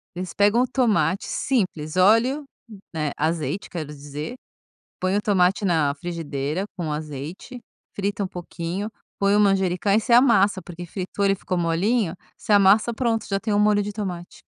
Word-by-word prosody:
eles 180 -1 -5
pegam 205 +4 +3
o 255 - +3
tomate, 205 - +1
simples, 180 - -1
óleo, 230 +10 +4 0.5
né, 155 -2 -1
azeite, 160 +5 -2
quero 160 -4 -5
dizer. 145 - -7 0.7
Põe 185 +2 +1
o 210 - 0
tomate 195 0 +2
na 160 -6 +2
frigideira 160 0 -3
com 160 -4 -3
azeite, 155 - -6 0.3
frita 200 +1 -2
um 190 - -2
pouquinho, 175 +3 -5 0.3
põe 200 0 +3
o 210 - +4
manjericão 195 -1 +2
e 215 - +5
você 235 +2 -2
amassa, 210 -6 +5
porque 175 0 -9
fritou, 190 +3 -3
ele 195 0 +4
ficou 185 -1 -3
molinho, 175 +4 +1 0.2
você 215 - -2
amassa, 205 +3 +5
pronto, 230 -2 0
já 195 -1 -1
tem 220 -2 -2
o 205 - +2
molho 210 0 +3
de 205 +1 -4
tomate. 180 -5 -6
190 Hz, 165 wpm, -23 LUFS, 170-210 Hz, 0.7 s, e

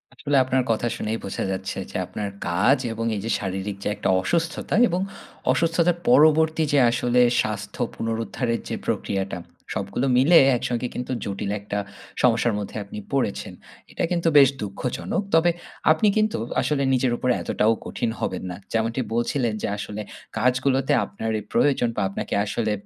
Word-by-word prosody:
আসলে 145 -1 0
আপনার 130 0 +1
কথা 115 +2 0
শুনেই 110 +1 -2
বোঝা 95 - -3
যাচ্ছে 95 0 -4
যে - - -3
আপনার 105 -1 -4 0.2
কাজ 95 +11 +3 0.2
এবং 115 +1 -3
এই 100 - -3
যে - - -2
শারীরিক 95 0 -4
যে - - 0
একটা - - -1
অসুস্থতা। 165 - -1
এবং 180 +1 -1 0.5
অসুস্থতার 170 +1 +2
পরবর্তী 155 +4 +5
যে 145 - +5
আসলে 120 +1 +2 0.2
স্বাস্থ্য - - -4
পুনরুদ্ধারের 115 +1 -2
যে - - -2
প্রক্রিয়াটা। 95 -2 -2 0.3
সবগুলো 100 +5 -2
মিলে 155 +7 +6 0.2
একসঙ্গে 120 +1 -2
কিন্তু 125 +1 -4
জটিল 100 0 -3
একটা 100 0 -3 0.4
সমস্যার 120 -1 +3
মধ্যে 100 - -6
আপনি 100 +1 -8
পড়েছেন। 130 -7 -1 0.4
এটা - - -3
কিন্তু 170 -1 +1
বেশ 135 -2 +8
দুঃখজনক। 105 - -3
তবে 165 +2 +5 0.4
আপনি 160 +7 +3
কিন্তু 215 0 +2 0.2
আসলে 145 -2 0
নিজের 130 -1 +2
উপরে 125 -1 +1
এতটাও 110 +2 +2
কঠিন 120 - -2
হবেন 95 - -3
না। 90 - -6 0.2
যেমনটি 115 +3 0
বলছিলেন 120 0 0
যে - - -1
আসলে 105 +1 -5 0.4
কাজগুলোতে 130 +2 +2
আপনারই 110 +2 -3
প্রয়োজন 135 -4 +3
বা - - -1
আপনাকে 100 - -5
আসলে 110 +1 -1
120 Hz, 155 wpm, -24 LUFS, 105-140 Hz, 0.5 s, বেশ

